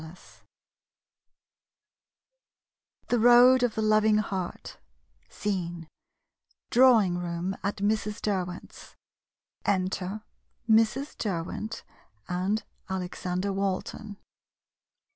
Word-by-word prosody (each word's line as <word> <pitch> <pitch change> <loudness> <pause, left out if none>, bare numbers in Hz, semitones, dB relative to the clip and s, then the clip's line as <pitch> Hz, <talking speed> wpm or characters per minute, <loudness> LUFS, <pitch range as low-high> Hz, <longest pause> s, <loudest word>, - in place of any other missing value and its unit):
*5 160 +3 -14 2.7
THE 240 - +2
ROAD 245 +2 +7
OF 245 -3 +1
THE 220 - -1
LOVING 215 0 +4
HEART 190 -4 -4 0.5
Scene 175 -5 -4 0.4
— - - -45
Drawing 225 -8 +5
room 175 +2 -3
at 200 +1 -1
Mrs. 210 +1 -1
Der 195 -3 0
went's. 175 0 -11 0.7
Enter 190 +1 -1 0.4
Mrs. 225 +6 +2
Derwent 200 +3 -4 0.4
and 190 +5 -1 0.3
Alexander 185 +1 -3
Walton. 195 +2 -3
200 Hz, 85 wpm, -27 LUFS, 180-220 Hz, 2.7 s, ROAD